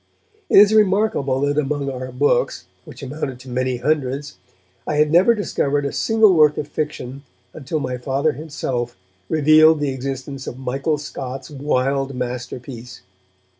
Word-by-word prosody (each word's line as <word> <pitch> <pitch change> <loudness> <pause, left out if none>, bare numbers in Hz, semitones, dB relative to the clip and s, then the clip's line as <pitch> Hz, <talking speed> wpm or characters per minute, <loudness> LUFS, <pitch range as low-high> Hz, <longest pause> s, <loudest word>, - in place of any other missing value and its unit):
It - - +5
is 205 +1 +8
remarkable 195 -10 +2
that 145 +1 +1
among 145 -1 -2
our 130 0 -6
books, 140 +4 0 0.2
which - - -11
amounted 135 -2 -5
to 130 - -12
many 130 0 -1
hundreds, 140 0 -2 0.5
I 150 - -1
had 150 0 +3
never 185 +8 +5
discovered 145 -8 -1
a 140 - -2
single 220 -3 +3
work 150 -3 +4
of 145 - -3
fiction 145 -3 -5 0.3
until 155 +1 -4
my 125 -3 -3
Father 135 +5 0
himself 135 -6 -4 0.3
revealed 155 +1 +5
the 145 -1 0
existence 135 +1 -6
of 125 - -6
Michael 135 +4 -1
Scott's 135 -2 -7
wild 135 -1 -1
masterpiece. 125 -1 -6
140 Hz, 145 wpm, -20 LUFS, 130-155 Hz, 0.5 s, is